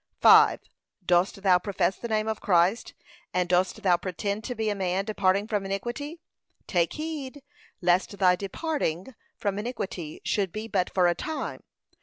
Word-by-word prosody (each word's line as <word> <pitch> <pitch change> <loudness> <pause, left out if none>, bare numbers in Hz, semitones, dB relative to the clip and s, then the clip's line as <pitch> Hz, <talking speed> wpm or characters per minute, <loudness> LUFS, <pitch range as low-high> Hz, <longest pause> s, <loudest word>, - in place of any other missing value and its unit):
5. - - +7 0.5
Dost 180 +3 +2
thou 185 -2 +5
profess 190 -1 0
the 235 - -6
name 215 -1 0
of 220 -1 -3
Christ, 200 - +2 0.4
and 180 -1 +1
dost 185 +4 +1
thou 180 -3 +4
pretend 200 +4 -3
to 250 - -4
be 220 -1 -2
a - - 0
man 190 0 -1
departing 200 -1 +1
from 210 -3 -1
iniquity? 240 - -4 0.5
take 170 -3 +1
heed, 295 -3 -6 0.4
lest 180 +3 +1
thy 185 -2 +4
departing 200 - -3 0.2
from 200 -1 -2
iniquity 195 -9 -5
should 195 -4 0
be 215 +3 -5
but 190 -5 0
for 185 -2 +3
a 175 - +3
time. 315 - -5
200 Hz, 160 wpm, -27 LUFS, 180-220 Hz, 0.5 s, 5